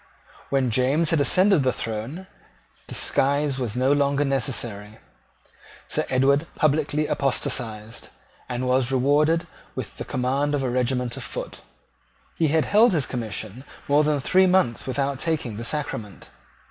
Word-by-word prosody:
When 135 -3 +1
James 135 +7 +2
had 165 -3 +2
ascended 185 +3 +4
the 130 -1 +2
throne, 115 - -5 0.6
disguise 140 0 +1
was 120 -4 -3
no 130 +3 +2
longer 140 0 +1
necessary. 115 -6 -2 0.9
Sir - - 0
Edward 140 +4 +2
publicly 150 0 +1
apostatized, 115 -6 -2 0.4
and 125 +1 -3
was 130 0 +2
rewarded 150 +5 +2 0.3
with - - -6
the - - -4
command 135 +3 -1
of 140 - -2
a 125 - -1
regiment 125 -1 -1
of - - -5
foot. - - -6 0.7
He 160 - +1
had 155 +1 +2
held 215 +2 +4
his 150 -6 +1
commission 110 0 -5 0.2
more 145 +2 +4
than 150 -1 +1
three 185 +7 +3
months 180 -13 +1
without 135 +1 -1
taking 145 -10 -2
the 115 - -5
sacrament. 115 - -4
135 Hz, 140 wpm, -24 LUFS, 125-150 Hz, 0.9 s, ascended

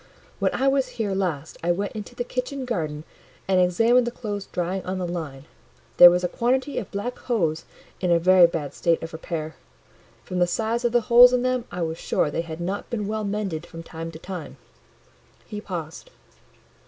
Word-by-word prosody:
—when - - +2
I 270 - +1
was 270 -1 +2
here 210 -4 -1
last, 170 -6 -3
I 175 - +2
went 200 +4 -1
into 215 +2 -8
the 245 - -2
kitchen 255 +2 -4
garden 155 -10 -3 0.4
and 185 -1 +4
examined 230 +7 +3
the - - -1
clothes 205 -5 -5
drying 180 +2 -2
on 185 +1 -3
the 185 - -2
line; 155 -6 -5 0.5
there 175 - +12
was 180 +1 +1
a - - +2
quantity 260 +8 0
of 210 - -7
black 220 +5 -4
hose 165 -10 -1 0.3
in 180 - -1
a 170 - +5
very 180 +1 +6
bad 150 -4 -4
state 170 -1 +1
of 165 - -7
repair: 160 -1 -5 0.7
from 180 -1 -4
the 175 - +4
size 225 +5 -1
of 240 - +2
the 240 0 +3
holes 245 +2 +7
in 250 0 +2
them 255 -2 0
I 180 - -3
was 160 0 -3
sure 150 - 0
they 165 - -1
had 165 -1 -7
not 190 +4 -4
been 215 -3 -2
well 215 0 -2
mended 200 -6 -3
from 165 -1 -9
time 165 0 -7
to - - -8
time." 165 -5 -8 0.9
He 210 0 -7
paused. 170 - -7
185 Hz, 200 wpm, -24 LUFS, 165-235 Hz, 0.9 s, there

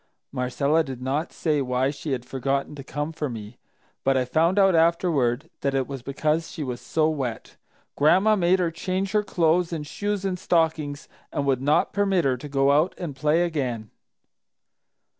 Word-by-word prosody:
Marcella 140 +5 +1
did 135 -4 -7
not 135 +6 -2
say 150 -3 0
why 130 +1 0
she 145 +1 -6
had 125 -2 -2
forgotten 135 +2 -2
to 140 -2 -8
come 145 +3 -4
for 150 -3 -3
me, 110 -1 -8 0.4
but 135 0 +3
I 130 - +1
found 165 +8 +2
out 195 -2 +5
afterward 160 -7 +2
that 140 0 -1
it 135 -1 +1
was 135 -1 -7
because 150 +5 -1
she 155 - -5
was 125 -3 -5
so 155 -1 +1
wet. 135 -7 -4 0.4
Gran'ma 190 +9 +4
made 180 -1 +3
her 175 -3 0
change 185 +3 -2
her 210 - +3
clothes 175 -3 +1
and 155 -3 -4
shoes 205 +5 -3
and 185 -2 -2
stockings 160 -5 0 0.2
and 140 - -2
would 135 -2 +1
not 145 +3 +2
permit 195 -5 +2
her 130 -2 +2
to 145 +4 -9
go 135 0 +3
out 155 +6 +2
and 165 -6 -5
play 150 +5 +2
again. 125 -10 -3
150 Hz, 180 wpm, -25 LUFS, 135-170 Hz, 0.4 s, out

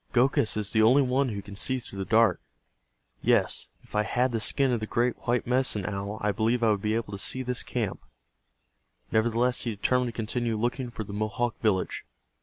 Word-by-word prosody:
"Gokhus 120 -3 +3
is 105 -2 -1
the 110 - +3
only 125 +6 +6
one 130 +1 +1
who 100 -3 -5
can 100 0 -10
see 130 +5 +1
through 105 -5 -7
the 95 - -2
dark. 110 -4 +4 0.8
Yes, - - +2 0.2
if - - -20
I 105 - +4
had 125 +5 0
the 115 - -1
skin 135 +5 +2
of 120 - +1
the 110 - -4
great 120 +2 +1
white 120 +1 +1
Medicine 125 -5 +1
Owl 100 +1 -4
I 105 - +1
believe 115 +3 0
I 110 - +4
would 100 -2 0
be 110 +1 0
able 115 -2 -3
to 100 - -5
see 130 +6 0
this 125 0 -1
camp." 115 -6 -3 1.1
Nevertheless 120 +3 +2
he 120 - -2
determined 125 +4 +1
to - - -3
continue 115 +1 -2
looking 120 +3 -2
for 115 -2 -6
the 100 - -9
Mohawk 110 +3 -1
village. 105 -5 0
115 Hz, 210 wpm, -27 LUFS, 105-125 Hz, 1.1 s, only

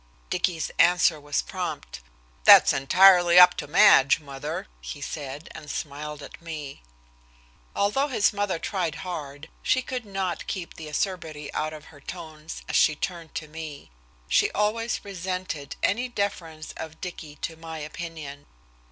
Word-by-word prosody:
Dicky's 170 -4 0
answer 175 -2 +5
was 145 0 -1
prompt. - - -5 0.4
"That's - - +9
entirely 175 +5 +6
up 180 - +9
to 145 - -4
Madge, 135 0 +6
mother," 140 -3 -6 0.2
he - - -7
said, 145 +1 -6
and 150 -1 -10
smiled 150 +1 -5
at - - -11
me. 155 - -7 0.9
Although 240 +8 +2
his 225 -6 +2
mother 205 -3 -1
tried 175 -2 -2
hard 150 -4 -6
she 255 - +2
could 250 -1 -4
not 195 -4 -3
keep 180 -4 -4
the 160 - -9
acerbity 155 -3 -3
out 155 0 -1
of 155 -1 -10
her 145 - -15
tones 160 -1 -8
as - - -3
she 155 - +4
turned 170 0 -5
to 155 - -4
me. 155 - -9 0.4
She - - +3
always 220 +2 0
resented 185 -6 -4
any 245 +6 +1
deference 175 -8 -3
of 160 0 -8
Dicky 160 -5 -7
to 165 - -5
my 160 0 -8
opinion. 155 -2 -7
160 Hz, 145 wpm, -26 LUFS, 150-185 Hz, 0.9 s, That's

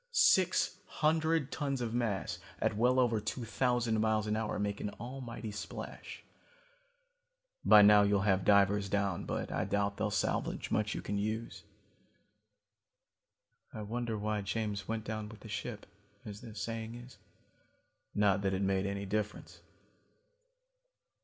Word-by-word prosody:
Six - - +4
hundred 160 -1 +1
tons 140 -3 -2
of 115 -2 -3
mass 115 -5 -1 0.2
at - - +1
well 125 +4 +3
over 120 -3 +3
two 115 +3 -4
thousand 120 -2 +1
miles 110 -1 +2
an 105 0 0
hour 110 -1 -2
make 105 0 -2
an - - -2
almighty 120 -2 -6
splash. 105 - -7 1.4
By 105 - +8
now 105 0 +8
you'll 100 -1 +3
have 95 -2 +2
divers 100 0 +4
down, 100 -3 0
but - - -3
I - - 0
doubt 100 0 0
they'll 110 - 0
salvage 105 - -1
much 105 0 0
you - - -5
can 100 0 -2
use. 110 +3 -3 2.1
"I 110 - -6
wonder 115 +1 -3
why 105 0 -1
James 100 -1 -3
went 110 -1 -2
down 110 -1 -4
with 110 -1 -12
the 110 - -10
ship, - - -5 0.4
as 105 -1 -8
the 110 -2 -10
saying 115 +1 -4
is? 120 +1 -12 1.0
Not 100 -1 +3
that 95 -1 0
it 95 - -1
made 95 0 +1
any 100 0 -3
difference. 105 +1 -3
105 Hz, 145 wpm, -33 LUFS, 100-115 Hz, 2.1 s, By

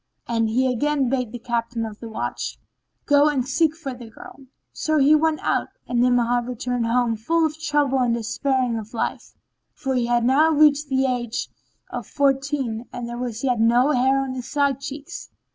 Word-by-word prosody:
And 225 -1 +1
he 250 +4 +1
again 270 +1 +1
bade 250 -4 -1
the 245 - -5
Captain 235 0 -2
of 215 -1 -8
the 230 - -8
Watch, 220 - -4 0.5
"Go 290 0 +5
and 260 -4 -1
seek 310 +3 +2
for 295 -5 -6
the 240 -2 -11
girl." 265 +4 -13 0.3
So 310 0 0
he 285 +1 +5
went 310 0 +2
out, - - 0 0.2
and 245 - 0
Ni'amah 245 -1 +3
returned 245 -1 -2
home 235 -1 +1
full 325 +10 +1
of 310 0 -3
trouble 290 -4 +1
and 240 -2 +2
despairing 245 +1 -1
of 220 +2 -10
life; - - -3 0.4
for 270 - -2
he 245 -2 0
had 240 -1 +2
now 285 +6 +4
reached 300 -1 +4
the 265 0 +2
age 245 -3 -2 0.4
of - - -5
fourteen 270 -4 0
and 240 - -5
there 240 0 -6
was 240 -1 -4
yet 250 -4 +1
no 240 +5 +4
hair 265 +1 +3
on 265 -1 -4
his 250 -2 -6
side 280 -2 +1
cheeks. 285 0 -7
255 Hz, 190 wpm, -23 LUFS, 235-285 Hz, 0.5 s, Go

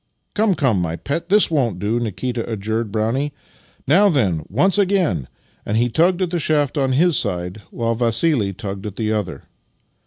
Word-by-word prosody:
"Come, 210 -3 +2
come, 125 - +1
my 85 -1 -2
pet; 165 - -4
this 205 -2 +4
won't 125 - +1
do," 105 +5 -1
Nikita 120 +1 -3
adjured 110 +1 -2
Brownie. 115 +7 -1 0.5
"Now 195 +9 +5
then, 100 - +1
once 185 - +2
again!" 180 - +1 0.4
and 105 - -1
he 120 +1 +2
tugged 175 +8 +2
at 175 - -2
the 175 - 0
shaft 150 -2 +1
on 135 -3 +1
his 165 +4 +3
side, 90 -2 -2
while 115 -1 -1
Vassili 115 -1 +1
tugged 100 0 -6
at 105 - -7
the 110 -1 -1
other. 95 -9 -3
120 Hz, 175 wpm, -20 LUFS, 105-155 Hz, 0.5 s, Now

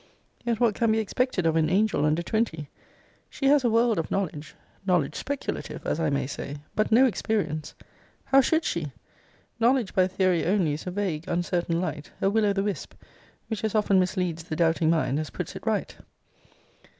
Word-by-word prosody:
Yet 235 -2 -1
what 235 -3 +3
can 230 +1 +1
be 220 - +2
expected 220 -2 0
of 160 -1 +2
an 160 -1 +2
angel 195 -4 +2
under 155 +3 +1
twenty? 170 -8 -1 0.6
She 275 - -5
has 280 0 +5
a 240 - +3
world 230 -2 +3
of 165 - -3
knowledge: 155 -6 -3 0.3
knowledge 180 -7 +1
speculative, 285 0 -5
as - - -1
I 160 -2 +1
may 140 -1 0
say, 140 +1 -6 0.2
but 215 - +1
no 245 +4 +7
experience. 175 - -1 0.5
How 270 0 +5
should 320 +5 +1
she? 155 -4 -2 0.7
Knowledge 240 -2 +2
by 185 -1 +3
theory 185 -2 +1
only 180 -5 +2
is 150 - -6
a - - 0
vague, 180 -4 -2
uncertain 175 -1 0
light: 155 -4 -4
a 195 - +2
Will 215 0 +2
o' 200 - +2
the 195 0 0
Wisp, 205 -2 -4 0.5
which 220 -3 -4
as 220 0 -1
often 205 -3 +3
misleads 180 -3 -1
the 155 - -4
doubting 165 0 +2
mind, 155 -3 +1
as 155 -2 -4
puts - - -6
it - - -9
right. - - -1
185 Hz, 185 wpm, -26 LUFS, 160-220 Hz, 0.7 s, no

